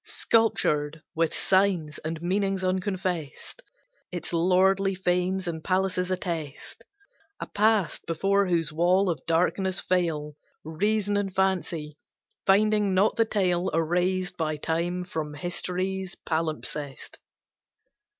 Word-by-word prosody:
Sculptured 155 -9 +1
with 165 -1 +1
signs 185 -6 +1
and 160 +1 -5
meanings 195 +1 0
unconfessed, 185 - -3 0.5
Its 175 -1 -5
lordly 190 +3 +3
fanes 180 +1 0
and 160 -2 -4
palaces 185 -1 0
attest 165 -6 -4 0.6
A - - -4
past 210 -5 +1
before 195 +4 +2
whose 165 -3 0
wall 180 +3 +3
of 155 -6 -5
darkness 180 +3 +1
fail 165 -5 -1 0.3
Reason 205 +6 0
and 200 -1 -1
fancy, 180 -5 -1 0.5
finding 205 0 +3
not 200 +4 +3
the 225 - +3
tale 185 -4 +1
Erased 180 +3 0
by 155 -2 -1
time 170 +4 -1
from 155 -4 -5
history's 185 +3 -3
palimpsest. 155 -3 -4
180 Hz, 110 wpm, -26 LUFS, 165-190 Hz, 0.6 s, lordly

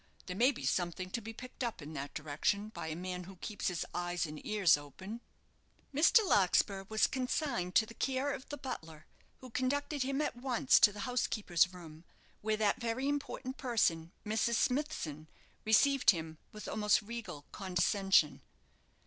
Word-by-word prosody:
There 180 - -5
may 250 +7 +5
be 265 - -7
something 185 +1 -1
to 235 - -2
be 225 +1 -7
picked 255 +3 -8
up 235 -2 -3
in 150 0 -8
that 140 -1 -6
direction 155 +8 -1
by 220 - -6
a 155 - -3
man 180 +1 -5
who 190 +1 -11
keeps 205 +4 -4
his 180 -3 -1
eyes 175 0 -1
and 150 -1 -8
ears 200 -7 +4
open." 190 - -8 0.7
Mr. 380 - +5
Larkspur 195 - +3
was 220 0 +3
consigned 250 - -1
to 220 - +6
the 230 - -11
care 265 +4 -1
of 275 -1 -8
the 290 - -5
butler, 160 - -7 0.4
who 255 -2 -10
conducted 285 +4 -1
him 270 +2 0
at 300 - -1
once 255 +1 +3
to 205 - +7
the 205 0 -7
housekeeper's 205 -7 +1
room, 165 -3 -11 0.4
where 215 0 0
that 220 +3 +1
very 235 +3 -1
important 280 -2 -3
person, 170 -10 +1
Mrs. 220 +2 +1
Smithson, 230 - -1 0.4
received 270 +5 +5
him 160 -4 +1
with 215 - -9
almost 210 -1 +2
regal 220 -10 -7
condescension. 190 -3 +2
210 Hz, 165 wpm, -33 LUFS, 175-255 Hz, 0.7 s, to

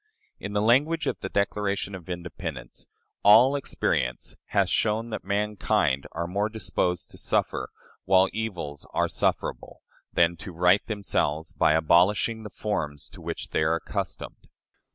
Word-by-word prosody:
In 100 - -6
the 105 0 +1
language 145 +8 +3
of - - -2
the 95 - -5
Declaration 100 0 -1
of 90 -3 -9
Independence, 85 -8 -6 0.3
"All 120 +7 +7
experience 60 - -1
hath - - +1
shown 110 +2 0
that - - -4
mankind 100 -8 0
are 85 +1 -2
more 100 +5 -1
disposed 90 -4 -2
to - - -9
suffer, 65 - 0 0.4
while 95 0 +5
evils 90 -10 -4
are - - +2
sufferable, - - -2 0.3
than 85 0 +3
to 95 +2 -8
right 90 +4 +4
themselves 80 -7 -1
by 75 - +3
abolishing 90 +8 +3
the 105 - -8
forms 75 -9 -3
to - - -13
which - - -5
they - - 0
are 80 +1 +2
accustomed." 85 - -5
95 Hz, 145 wpm, -26 LUFS, 85-105 Hz, 0.4 s, All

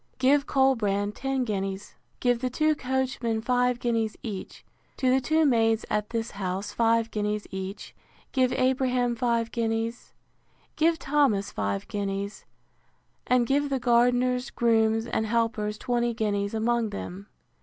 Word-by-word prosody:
Give 280 +2 +3
Colbrand 210 -7 +2
ten 270 +2 -1
guineas: 195 -3 -3 0.3
give 245 -1 +2
the 255 - 0
two 310 +5 +2
coachmen 260 -4 -1
five 250 +1 +1
guineas 230 -3 -1
each; 205 -5 -7 0.3
to 255 -1 +2
the 265 +1 +3
two 315 +3 +2
maids 225 -4 +2
at 210 0 0
this 230 0 -3
house 195 +1 -3
five 230 0 +2
guineas 210 0 -2
each; 190 +1 -6 0.4
give 255 -2 +2
Abraham 255 -2 +1
five 235 -1 0
guineas; 230 0 -2 0.6
give 325 +1 +3
Thomas 270 -10 +1
five 100 -1 -2
guineas; 200 0 -4 0.8
and 250 -1 +3
give 285 +3 +1
the 270 - 0
gardeners, 245 +1 +2
grooms, 225 -1 +2
and 220 -1 -1
helpers, 225 -2 0
twenty 240 -1 -1
guineas 205 -1 -1
among 230 0 +1
them. 200 -1 -7
230 Hz, 135 wpm, -27 LUFS, 210-255 Hz, 0.8 s, Give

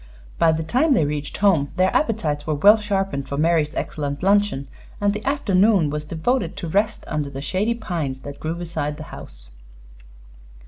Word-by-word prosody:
By 165 - +5
the 160 0 -1
time 265 - +2
they 165 - +3
reached 145 0 -4
home 175 -9 +3
their 185 +1 +2
appetites 160 - 0
were 155 - +1
well 205 +9 +7
sharpened 195 -10 -2
for 140 - -3
Mary's 155 -1 +2
excellent 145 0 -3
luncheon, 200 -8 +2 0.3
and 205 0 +2
the 210 +1 -5
afternoon 205 - +3
was 150 0 -3
devoted 170 +12 -1
to 170 - -4
rest 205 +6 0
under 150 -2 -2
the 135 -1 -7
shady 190 +11 -1
pines 160 - -4
that 140 0 -9
grew 160 +2 -3
beside 160 -4 -4
the 155 - -7
house. - - -9
165 Hz, 175 wpm, -22 LUFS, 145-205 Hz, 0.3 s, well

